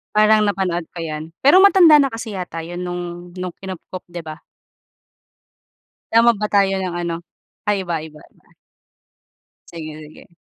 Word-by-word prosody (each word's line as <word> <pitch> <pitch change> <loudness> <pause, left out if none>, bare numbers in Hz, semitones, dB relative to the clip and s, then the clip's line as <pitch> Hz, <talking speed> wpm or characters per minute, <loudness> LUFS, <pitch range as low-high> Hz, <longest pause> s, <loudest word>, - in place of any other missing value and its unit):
Parang 215 0 +5
napanood 180 -4 -1
ko 170 - -6
yan, 155 0 -6
pero 285 +7 +6
matanda 375 -5 +7
na 285 - +4
kasi 225 -5 -5
yata 175 -2 -5
'yon, 175 +2 -6
nung 175 0 -6
nung 180 0 -5
kinupkop, 185 -1 -8
'di 175 0 -8
ba? 155 -1 -8 1.8
Tama 230 +1 +6
ba 210 - -2
tayo, 195 -2 +2
ng 185 -2 -3
ano? 170 -1 -3 0.5
Ay, 205 -2 +1
iba, 175 -3 -2
iba, 155 -1 -13
iba. - - -24 1.2
Sige, 155 -2 -8
sige. 170 - -18
180 Hz, 150 wpm, -20 LUFS, 170-210 Hz, 1.8 s, matanda